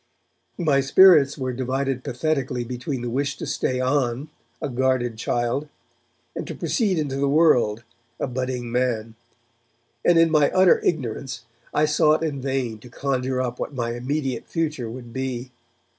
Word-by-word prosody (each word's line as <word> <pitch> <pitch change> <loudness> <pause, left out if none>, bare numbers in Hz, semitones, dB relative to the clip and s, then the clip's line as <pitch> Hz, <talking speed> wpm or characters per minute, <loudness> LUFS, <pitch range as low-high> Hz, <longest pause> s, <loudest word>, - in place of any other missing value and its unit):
My 150 -6 +2
spirits 145 0 +6
were 130 -2 -2
divided 130 +1 -2
pathetically 135 -2 -1
between 125 +2 -4
the 120 - -2
wish 140 +2 -1
to - - -5
stay 130 0 -1
on, 130 +1 0 0.3
a - - -2
guarded 130 -2 0
child, 120 +5 -1 0.7
and - - -5
to - - -5
proceed 205 -7 0
into 145 -3 -2
the 140 0 +1
world, 125 -8 +3 0.4
a - - 0
budding 125 -2 -3
man, 120 -3 -1 0.9
and, 175 - +5
in 165 -1 +5
my 150 -2 +4
utter 185 -1 +6
ignorance, 130 -4 -2 0.3
I 150 - +2
sought 150 +1 +3
in 145 -4 -2
vain 130 -4 -2
to 125 - -13
conjure 130 0 -1
up 125 -1 -4
what 145 - -4
my 120 -2 -2
immediate 130 0 -3
future 155 -8 -2
would 120 0 -9
be. 130 -1 -4
130 Hz, 155 wpm, -23 LUFS, 120-145 Hz, 0.9 s, spirits